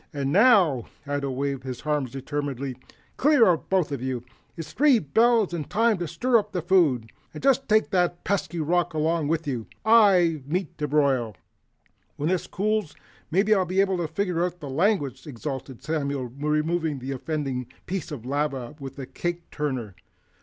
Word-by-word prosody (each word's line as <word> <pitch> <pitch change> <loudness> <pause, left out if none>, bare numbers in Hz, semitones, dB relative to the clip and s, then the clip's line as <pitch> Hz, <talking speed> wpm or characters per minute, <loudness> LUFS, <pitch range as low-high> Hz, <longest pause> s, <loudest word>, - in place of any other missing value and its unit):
And 140 -3 -2
NOW 185 - +5
" - - -34
Ato 145 -1 -2
waved 135 0 -2
his 130 -2 -6
arms 150 -4 0
determinedly. 135 0 -4 0.4
"Clear 290 -4 +5
out, 175 -5 +1
both 185 -6 +1
of 140 -4 -3
you. 130 -2 -3 0.3
It's 165 - -7
three 285 -3 +5
bells 220 - +2
and 155 -4 -4
time 225 -2 +2
to 175 - -2
stir 245 +6 +2
up 205 - -7
the 180 -4 -2
food. 150 -12 +2 0.2
And - - -8
just 270 -2 +2
take 215 0 +3
that 175 -2 +1
pesky 185 -3 -1
rock 170 +1 0
along 155 0 +1
with 165 +1 0
you. 125 -6 -3 0.2
I've 180 - +5
meat 175 +1 -2
to 150 - -1
broil!" 135 -8 +1 0.8
"When 150 +3 -1
this 185 -1 0
cools, 210 -4 -1 0.3
maybe 200 +6 +3
I'll 195 -3 +3
be 185 +2 -1
able 195 -1 +2
to 170 -2 -1
figure 180 -1 -1
out 180 0 -3
the 145 -4 -7
language," 145 - 0
exulted 135 -1 -6
Samuel, 140 -4 -2
removing 150 +3 -1
the 130 +1 -5
offending 135 -2 -3 0.2
piece 185 -3 -4
of 130 -6 -7
lava 135 -2 -2
with 135 0 -8
a 135 - -5
cake 175 +4 -5
turner. 130 - -3
155 Hz, 175 wpm, -25 LUFS, 135-185 Hz, 0.8 s, NOW